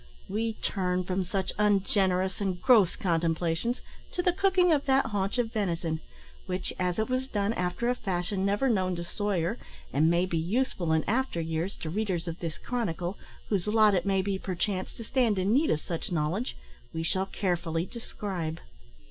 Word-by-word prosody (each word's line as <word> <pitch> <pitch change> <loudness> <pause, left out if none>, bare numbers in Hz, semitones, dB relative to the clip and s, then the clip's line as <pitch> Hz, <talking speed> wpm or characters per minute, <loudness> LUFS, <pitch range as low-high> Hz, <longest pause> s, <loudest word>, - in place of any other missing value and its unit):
We 225 +3 -1
turn 185 -4 -1
from 185 +1 -1
such 190 +1 -2
ungenerous 195 -2 +2
and 190 -3 -1
gross 215 -7 +5
contemplations 170 +5 0 0.3
to 355 - -1
the 360 - +3
cooking 365 -1 +4
of 285 -2 +1
that 270 0 +4
haunch 205 0 -1
of 230 -2 0
venison, 170 -6 -1 0.5
which, 185 0 -2
as 180 -1 0
it 220 - +1
was 255 +1 -1
done 205 -3 0
after 180 +4 -1
a 245 - +4
fashion 190 -3 -2
never 205 +7 +2
known 185 -6 +2
to 170 - -4
Soyer, 195 +1 -1 0.3
and 155 +4 +4
may 170 +2 +3
be 170 -3 -1
useful 185 -1 0
in 160 0 +3
after 250 -5 +1
years 165 +3 -2
to 160 - -3
readers 185 -3 -1
of 165 0 -4
this 165 -2 -4
chronicle, 195 -6 -2 0.3
whose 200 -2 0
lot 215 -1 +5
it 190 +1 +1
may 195 -1 +2
be, 195 -1 -1
perchance, 185 +1 -2
to 230 - -7
stand 230 -3 +2
in 190 +3 +2
need 295 +5 +4
of 155 - +2
such 170 0 -4
knowledge, 175 - -1 0.4
we 160 - -1
shall 190 +4 0
carefully 170 -4 -1
describe. 190 -8 -5
190 Hz, 180 wpm, -29 LUFS, 175-220 Hz, 0.5 s, gross